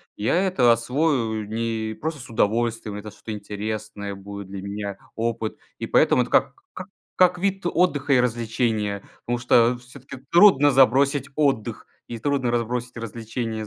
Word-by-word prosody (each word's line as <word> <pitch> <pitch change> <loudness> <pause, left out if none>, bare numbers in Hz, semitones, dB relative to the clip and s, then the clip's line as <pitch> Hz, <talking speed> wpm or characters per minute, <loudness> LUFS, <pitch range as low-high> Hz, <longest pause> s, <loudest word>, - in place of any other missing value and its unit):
Я 105 +8 0
это 125 -10 +4
освою 115 -3 0
не 110 0 -2
просто 155 +5 -5
с 125 - -10
удовольствием, 115 -1 0
это 105 +1 -7
что-то 110 +2 -8
интересное 105 -1 -5
будет 100 0 -9
для 95 0 -7
меня, 100 0 -5 0.2
опыт. 115 -1 -2 0.2
И - - -4
поэтому - - +3
это - - -10
как - - +3 0.2
как 185 +3 -8 0.3
как 180 -1 +4
вид 195 0 -1
отдыха 150 -6 +1
и 125 - +5
развлечения. 115 -4 -1 0.2
Потому 120 0 -1
что, 120 0 +3
всё-таки, 130 +1 -12
трудно 170 -6 +7
забросить 135 +1 +3
отдых 135 -7 0 0.2
и 120 - -6
трудно 135 0 0
разбросить 120 +1 -2
развлечения. 115 0 -5
115 Hz, 150 wpm, -23 LUFS, 110-135 Hz, 0.3 s, трудно